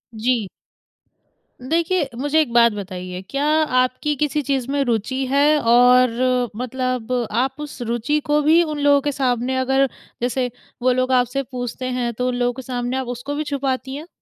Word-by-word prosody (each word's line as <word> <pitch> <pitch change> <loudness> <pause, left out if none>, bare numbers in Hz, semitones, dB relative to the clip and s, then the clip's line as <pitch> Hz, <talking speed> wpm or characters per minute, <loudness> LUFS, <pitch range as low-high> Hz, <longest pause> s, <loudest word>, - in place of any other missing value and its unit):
जी। 230 -1 0 1.1
देखिए 330 +3 0
मुझे 290 +5 +1
एक 285 -6 -2
बात 235 -1 +6
बताइए 185 -3 -6
क्या 280 +1 -1 0.3
आपकी 255 +4 +1
किसी 295 +1 0
चीज़ 270 -3 -1
में 280 0 +1
रुचि 245 +3 -1
है? 285 +3 +4
और 250 0 +4
मतलब 255 0 -3 0.2
आप 260 +4 0
उस 295 -4 -8
रुचि 240 +6 0
को 295 0 +2
भी 315 +3 +5
उन 305 -2 -4
लोगों 285 -1 +4
के 290 - -1
सामने 255 -2 0
अगर 265 +1 +2 0.3
जैसे 250 +1 0 0.3
वो 255 - +3
लोग 255 +1 0
आपसे 250 +2 +1
पूछते 250 0 -5
हैं, 250 -2 -2
तो 250 +3 -2
उन 250 - -1
लोगों 245 0 0
के 260 - -7
सामने 250 0 -3
आप 260 -1 -3
उसको 245 +4 -5
भी 305 - -2
छुपाती 270 -2 -3
हैं? 305 +4 -8
255 Hz, 175 wpm, -21 LUFS, 245-280 Hz, 1.1 s, बात